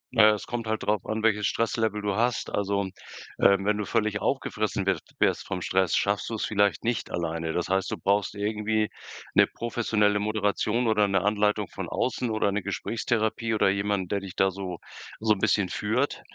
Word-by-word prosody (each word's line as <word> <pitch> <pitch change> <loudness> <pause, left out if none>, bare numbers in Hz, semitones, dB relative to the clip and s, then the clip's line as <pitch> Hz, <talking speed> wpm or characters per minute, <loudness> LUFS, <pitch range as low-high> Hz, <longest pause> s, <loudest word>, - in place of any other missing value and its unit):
Naja, 110 -2 +7
es 105 - -7
kommt 115 -1 -4
halt 110 -1 -1
drauf 105 -3 0
an 110 0 -2
welches 105 -2 +2
Stresslevel 110 -2 0
du 100 -1 0
hast. 120 +2 0
Also, 100 0 0 0.6
ähm, 100 0 +5
wenn 105 0 +2
du 105 - -2
völlig 110 -2 0
aufgefressen 105 -7 -1
wir 95 -3 +1 0.2
wirst - - +1
vom 95 -1 -3
Stress, 95 +2 +1
schaffst 100 0 0
du's 110 -2 -2
vielleicht 100 -1 +1
nicht 120 -1 -1
alleine. 80 -1 -2
Das 90 - -1
heißt, 95 +1 0
du - - -3
brauchst 100 +1 0
irgendwie 105 +1 0 0.4
'ne - - +6
professionelle 105 -3 +1
Moderation 105 +2 0
oder 105 -2 +3
'ne 95 -1 +1
Anleitung 105 0 +1
von - - -6
außen, 125 -1 -1
oder 110 -2 +1
'ne 105 +1 -1
Gesprächstherapie 110 +3 -1
oder 105 - +3
jemanden 100 -1 0
der 100 +2 -1
dich 95 -2 -9
da 95 0 +3
so 95 -2 -5 0.4
so 110 0 +3
'n 100 - -5
bisschen 100 -2 +2
führt. 115 +9 -1
105 Hz, 185 wpm, -27 LUFS, 100-110 Hz, 0.6 s, Naja